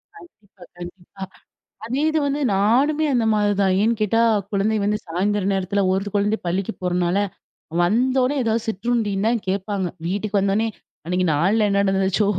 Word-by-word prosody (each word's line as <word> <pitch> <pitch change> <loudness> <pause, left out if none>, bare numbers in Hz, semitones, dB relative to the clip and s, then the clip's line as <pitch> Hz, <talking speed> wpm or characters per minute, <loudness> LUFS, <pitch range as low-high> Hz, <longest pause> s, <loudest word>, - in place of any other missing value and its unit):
கண்டிப்பா, 215 - -17
கண்டிப்பா. 175 +2 -10 0.6
அதே 255 +5 -2
இது 315 0 +1
வந்து, 280 +1 -1 0.2
நானுமே 265 +10 +2
அந்த 240 -3 +1
மாதிரி 205 -1 +2
தான் 190 -1 +2
ஏன்னு 230 +2 +2
கேட்டா 220 +2 +2 0.3
குழந்தை 210 +2 +1
வந்து 210 +1 +1
சாயந்திரம் 195 +3 0
நேரத்தில 195 +1 -1
ஒரு 195 +1 -2
குழந்தை 205 +2 +1
பள்ளிக்கு 190 +5 -2
போறனால, 180 0 0 0.7
வந்தோன்னே 255 +7 +1
ஏதாவது 225 0 -1
சிற்றுண்டி 220 0 -1
தான் 235 0 +1
கேட்பாங்க. 195 0 -2 0.2
வீட்டுக்கு 205 +2 -1
வந்தோன்னே 200 +3 +1 0.4
அன்னைக்கு 180 +2 0
நாள்ல 195 +9 +2
என்ன 200 0 +2
நடந்துச்சோ 195 +1 +1
205 Hz, 145 wpm, -21 LUFS, 190-225 Hz, 0.7 s, நானுமே